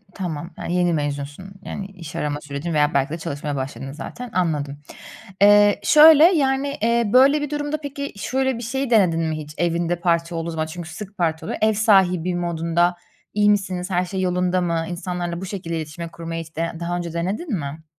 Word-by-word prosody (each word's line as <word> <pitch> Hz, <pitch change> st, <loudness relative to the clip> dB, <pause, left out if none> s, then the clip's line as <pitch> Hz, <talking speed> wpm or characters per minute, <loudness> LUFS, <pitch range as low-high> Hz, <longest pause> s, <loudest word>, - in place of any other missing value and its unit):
Tamam, 170 Hz, -4 st, -4 dB, 0.2 s
he, 175 Hz, -, -2 dB
yeni 175 Hz, -1 st, +2 dB
mezunsun. 145 Hz, +4 st, -4 dB
Yani, 195 Hz, -, -5 dB
iş 180 Hz, -6 st, -11 dB
arama 145 Hz, 0 st, -2 dB
sürecin 150 Hz, +3 st, -5 dB
veya 150 Hz, -1 st, +2 dB
belki 140 Hz, 0 st, +1 dB
de -, -, -3 dB
çalışmaya 145 Hz, -2 st, -4 dB
başladın, 135 Hz, 0 st, -5 dB
zaten. 200 Hz, -, -8 dB
Anladım. 150 Hz, -6 st, -1 dB, 0.6 s
Eee, 205 Hz, 0 st, +6 dB
şöyle 305 Hz, 0 st, +8 dB
yani, 280 Hz, -5 st, +3 dB
eee, 235 Hz, 0 st, +2 dB
böyle 275 Hz, +4 st, +6 dB
bir 295 Hz, -, -3 dB
durumda 295 Hz, +1 st, -2 dB
peki, 280 Hz, -1 st, -5 dB
şöyle 265 Hz, +4 st, -1 dB
bir 235 Hz, -, -6 dB
şeyi 265 Hz, +3 st, -2 dB
denedin 185 Hz, -8 st, +4 dB
mi 160 Hz, -1 st, -1 dB
hiç 150 Hz, -1 st, -8 dB
evinde 170 Hz, 0 st, 0 dB
parti 170 Hz, 0 st, 0 dB
olduğu 165 Hz, 0 st, -3 dB
zaman? 160 Hz, -1 st, -2 dB
Çünkü 170 Hz, +1 st, -8 dB
sık 200 Hz, +4 st, -9 dB
parti 160 Hz, -3 st, -1 dB
oluyor. -, -, -3 dB
Ev 220 Hz, 0 st, +4 dB
sahibi 185 Hz, -5 st, +3 dB
modunda; 170 Hz, 0 st, 0 dB, 0.4 s
"İyi 210 Hz, 0 st, +3 dB
misiniz? 190 Hz, -3 st, 0 dB
Her 180 Hz, -1 st, +1 dB
şey 190 Hz, +1 st, -3 dB
yolunda 180 Hz, 0 st, +1 dB
mı?" 170 Hz, -2 st, -1 dB
insanlarla 175 Hz, -1 st, -4 dB
bu -, -, -4 dB
şekilde 180 Hz, -4 st, -4 dB
iletişimi 160 Hz, +2 st, -6 dB
kurmayı, 165 Hz, 0 st, -5 dB
hiç 160 Hz, 0 st, -18 dB
de 165 Hz, +1 st, -1 dB
daha 175 Hz, +1 st, -2 dB
önce 170 Hz, -2 st, -5 dB
denedin 200 Hz, -, -3 dB
mi? 150 Hz, -1 st, -5 dB
175 Hz, 190 wpm, -22 LUFS, 165-205 Hz, 0.6 s, şöyle